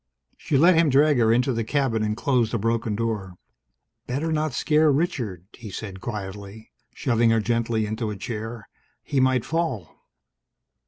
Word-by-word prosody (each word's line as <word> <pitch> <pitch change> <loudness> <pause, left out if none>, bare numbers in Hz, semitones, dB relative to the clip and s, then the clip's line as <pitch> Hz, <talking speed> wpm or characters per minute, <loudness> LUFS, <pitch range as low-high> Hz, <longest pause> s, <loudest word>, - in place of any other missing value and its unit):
She 140 - -1
let 170 +6 +6
him 165 -2 +4
drag 145 0 +4
her 110 -1 +4
into 125 +3 +2
the 115 0 -1
cabin 130 -3 0
and 105 0 -1
close 125 -3 +1
the 115 - -1
broken 115 0 -1
door. 105 -5 -3 0.7
"Better 145 +6 -2
not 155 -1 0
scare 150 +4 +3
Richard," 125 - -2
he 115 -3 -10
said 95 -1 -7
quietly, 105 0 -7 0.2
shoving 120 -3 +2
her 115 0 +3
gently 115 0 0
into 110 +1 -3
a 105 - -4
chair. 110 +1 -6 0.4
"He 140 - -1
might 130 -2 +2
fall." 160 - -3
115 Hz, 160 wpm, -24 LUFS, 110-135 Hz, 0.7 s, let